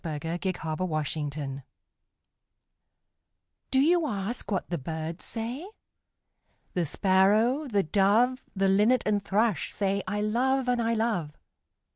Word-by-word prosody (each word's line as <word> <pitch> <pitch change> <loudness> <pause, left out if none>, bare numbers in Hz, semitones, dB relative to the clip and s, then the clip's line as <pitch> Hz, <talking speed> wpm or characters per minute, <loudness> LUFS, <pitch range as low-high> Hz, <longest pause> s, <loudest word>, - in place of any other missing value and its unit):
ANSWER 165 +2 -3
TO 190 - -1
A - - 0
CHILD'S - - -11 0.2
QUESTION[386:1] 150 -4 -3 2.1
Do 265 - +2
you 330 +3 +3
ask 210 0 -3
what 195 -3 -1
the 170 - -1
birds 160 +5 -5
say? 240 +9 -4 1.1
The 175 -3 0
Sparrow, 210 - +3
the 205 -5 +1
Dove, 215 +9 +3
The 195 0 +2
Linnet 210 +6 +4
and 205 -2 +1
Thrush 210 0 0
say, 200 0 0
'I 210 0 -1
love 255 +5 +1
and 245 -1 +2
I 230 0 +1
love!' 215 -10 -1
205 Hz, 130 wpm, -28 LUFS, 170-235 Hz, 2.1 s, Linnet